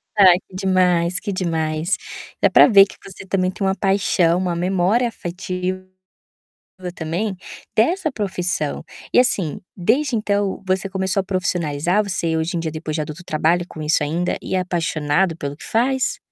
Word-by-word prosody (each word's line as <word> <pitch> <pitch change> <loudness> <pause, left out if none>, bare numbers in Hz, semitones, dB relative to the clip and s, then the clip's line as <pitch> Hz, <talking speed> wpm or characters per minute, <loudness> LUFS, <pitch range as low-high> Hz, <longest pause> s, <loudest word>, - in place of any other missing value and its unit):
Ai, 185 -4 +7
que 185 - -15
demais, 180 -2 +2
que 205 - -4
demais! 165 -1 -1 0.4
Dá - - +5
para - - +7
ver 200 -5 +8
que - - -14
você, 190 0 -11
também, 185 -1 0
tem 195 - -3
uma 190 0 +1
paixão, 185 -3 +2
uma 180 -2 -1
memória 190 +7 +1
afetiva, 185 -2 -4 1.1
também, 180 +5 -3 0.4
dessa 330 - +2
profissão. 185 - -2 0.3
E, - - +4
assim, 190 - 0 0.2
desde 245 +8 +1
então 205 -2 -1
você 185 +1 0
começou 190 0 -1
a - - -2
se - - -19
profissionalizar? 175 -1 0
Você 170 -5 -1
hoje 160 +3 -1
em - - 0
dia, 165 -1 -3
depois 155 0 -4
de 155 - -1
já - - -5 0.2
trabalhar 165 +3 +1
com 155 - -10
isso, 150 0 +2
ainda 165 +4 -1
é - - -2
apaixonado 170 -1 0
pelo 145 -3 -5
que - - -12
faz? 255 +3 0
185 Hz, 165 wpm, -21 LUFS, 170-195 Hz, 1.1 s, ver